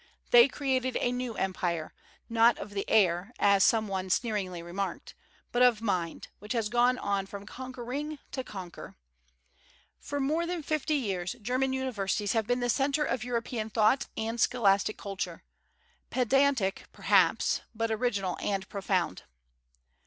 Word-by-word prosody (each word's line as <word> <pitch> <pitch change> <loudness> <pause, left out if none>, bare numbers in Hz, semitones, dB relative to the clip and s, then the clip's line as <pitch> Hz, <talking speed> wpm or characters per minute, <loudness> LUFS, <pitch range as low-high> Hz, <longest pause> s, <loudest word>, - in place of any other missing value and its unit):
They 240 +1 +9
created 260 -2 -1
a 245 - +1
new 250 -2 -3
empire, 175 -4 -2 0.3
not 230 +1 +4
of 205 - -7
the 200 -1 -4
air, 185 0 +3
as 200 -1 +4
some 220 -2 +3
one 190 -1 -3
sneeringly 185 -5 -1
remarked, 190 +3 -4 0.4
but 245 - +1
of 245 -3 +5
mind, 185 -7 -2
which 210 +4 -5
has 225 -3 0
gone 245 +2 +3
on 200 -4 -1
from 200 0 -8
conquering 260 +5 -5
to 260 - -3
conquer. 185 -7 -9 1.0
For 285 - -4
more 310 +5 0
than 350 -2 -3
fifty 305 0 0
years 190 -9 -2
German 255 +4 0
universities 210 -6 -1
have 220 -2 0
been 245 0 +1
the 245 - 0
centre 280 +3 +1
of 240 -4 -1
European 235 -2 -3
thought 220 +4 +2
and 225 +1 -2
scholastic 205 -3 +2
culture, 195 -1 -5 0.7
pedantic, 255 -5 +2
perhaps, - - +2
but 225 0 -1
original 210 -5 -1
and 195 -1 -2
profound. 190 - -1
225 Hz, 145 wpm, -29 LUFS, 195-255 Hz, 1.0 s, They